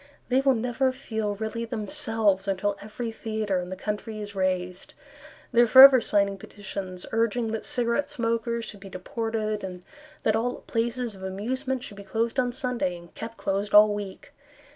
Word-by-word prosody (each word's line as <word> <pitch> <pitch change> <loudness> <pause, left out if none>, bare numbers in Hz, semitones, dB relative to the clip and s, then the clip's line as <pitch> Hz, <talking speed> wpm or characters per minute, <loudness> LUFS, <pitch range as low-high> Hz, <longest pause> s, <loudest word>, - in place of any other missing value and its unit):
They 260 +1 +3
will 270 -1 +4
never 250 +3 +1
feel 220 -5 -3
really 220 +2 -3
themselves 225 -4 0
Until 200 +1 0
every 220 +3 -5
theatre 215 -4 -2
in 180 0 -5
the 185 - -4
country 210 +2 -4
is 205 -1 -6
razed. 185 -1 -2 0.6
They 240 -1 +5
are 240 - +5
forever 260 +1 +10
signing 200 -2 +1
petitions 190 -2 -7
Urging 230 0 +1
that 225 -1 -4
cigarette 240 +3 0
smokers 230 0 -1
should 205 - -10
be 195 0 -10
deported, 215 +2 -3
And 180 -2 -7 0.4
that 215 - +3
all 240 +2 -1
places 235 0 -2
of 190 - -13
amusement 250 +7 -3
should 205 - -9
be 200 - -8
closed 225 +5 -1
on 250 -1 +1
Sunday 245 -8 -1
And 170 0 -15
kept 230 +1 -7
closed 200 +1 -1
all 210 0 +8
week. 205 -2 -7
220 Hz, 170 wpm, -26 LUFS, 200-235 Hz, 0.6 s, forever